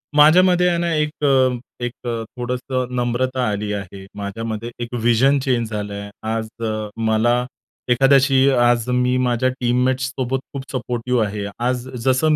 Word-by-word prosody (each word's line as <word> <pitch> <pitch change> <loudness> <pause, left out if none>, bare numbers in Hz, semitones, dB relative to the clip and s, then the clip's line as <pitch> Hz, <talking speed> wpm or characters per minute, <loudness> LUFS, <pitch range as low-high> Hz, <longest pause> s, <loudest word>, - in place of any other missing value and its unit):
माझ्यामध्ये 180 +4 +6
आहे 170 - +1
ना 170 -1 0
एक 150 -1 +1 0.2
अ, 130 -2 +3 0.3
एक 120 - -1 0.2
अ, 115 -1 -2
थोडंसं 125 +1 -3
नम्रता 125 +1 0
आली 105 0 -3
आहे. 100 -1 -7
माझ्यामध्ये 110 +3 -4
एक 120 - -8
व्हिजन 120 +4 +3
चेंज 125 -4 0
झालं 105 -1 -4
आहे. 100 0 -6 0.2
आज 110 0 -2 0.2
अ, 110 -1 -3 0.2
मला 110 +2 +3 0.5
एखाद्याशी 135 +1 +4
आज 120 -2 +3
मी 125 0 +2
माझ्या 125 +1 +1
टीममेट्स 125 +1 +1
सोबत 130 0 -2
खूप 140 -1 -5
सपोर्टिव्ह 125 -2 -1
आहे. 105 0 -4
आज 125 +1 -1 0.2
जसं 135 +4 +3
125 Hz, 150 wpm, -20 LUFS, 115-130 Hz, 0.5 s, माझ्यामध्ये